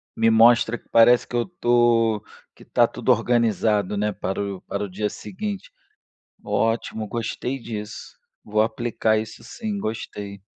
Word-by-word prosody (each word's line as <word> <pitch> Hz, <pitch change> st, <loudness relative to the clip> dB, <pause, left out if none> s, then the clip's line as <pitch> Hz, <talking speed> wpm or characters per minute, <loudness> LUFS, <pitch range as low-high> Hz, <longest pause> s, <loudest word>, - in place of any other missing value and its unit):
Me 115 Hz, 0 st, +3 dB
mostra 115 Hz, +1 st, +5 dB
que -, -, -29 dB
parece 120 Hz, +1 st, +6 dB
que 120 Hz, -, -7 dB
eu 120 Hz, -, +2 dB
estou 120 Hz, -, +2 dB, 0.3 s
que -, -, -17 dB
está -, -, +3 dB
tudo -, -, 0 dB
organizado, 110 Hz, -4 st, +2 dB
né, 105 Hz, +1 st, 0 dB
para 95 Hz, 0 st, -3 dB
o 100 Hz, -2 st, -4 dB
para 100 Hz, +1 st, -4 dB
o 100 Hz, -, -4 dB
dia 105 Hz, +3 st, -2 dB
seguinte. 205 Hz, -, -6 dB, 0.7 s
Ótimo, 115 Hz, -1 st, -1 dB
gostei 120 Hz, +4 st, -3 dB
disso. 105 Hz, -2 st, -7 dB, 0.3 s
Vou 105 Hz, 0 st, 0 dB
aplicar 110 Hz, 0 st, +1 dB
isso 110 Hz, +1 st, -7 dB
sim, 210 Hz, -, -5 dB
gostei. 100 Hz, -, -5 dB
115 Hz, 150 wpm, -23 LUFS, 105-120 Hz, 0.7 s, parece